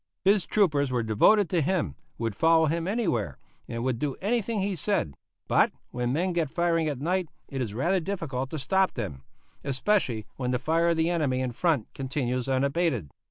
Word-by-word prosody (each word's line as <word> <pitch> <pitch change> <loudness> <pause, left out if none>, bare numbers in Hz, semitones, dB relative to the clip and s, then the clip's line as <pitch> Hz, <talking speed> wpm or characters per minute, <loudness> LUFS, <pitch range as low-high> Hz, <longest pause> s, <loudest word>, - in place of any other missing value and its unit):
His 195 -3 +4
troopers 150 -10 +2
were 125 -2 0
devoted 175 - +4
to 175 - +2
him, 155 - 0 0.2
would 115 -3 -2
follow 160 +5 +4
him 165 +2 -1
anywhere, 165 - -1 0.3
and 115 0 -4
would 125 -3 -1
do 145 -1 -1
anything 225 +1 -1
he 195 0 -1
said; 165 - 0 0.3
but - - +4 0.2
when 125 0 -1
men 175 +6 0
get 165 -4 0
firing 165 0 +1
at 145 -4 -2
night 175 +3 0 0.2
it 135 -2 -3
is 110 -4 -3
rather 175 +10 +2
difficult 160 -8 -3
to 155 - -4
stop 190 +7 +1
them, 65 -3 -4 0.4
especially 135 - 0
when 125 -2 -2
the 125 - +1
fire 165 +6 +1
of 170 - +1
the 160 +2 +2
enemy 145 -7 +1
in 130 -1 -1
front 150 -3 0
continues 130 -2 -2
unabated. 135 - 0
150 Hz, 185 wpm, -27 LUFS, 125-175 Hz, 0.4 s, His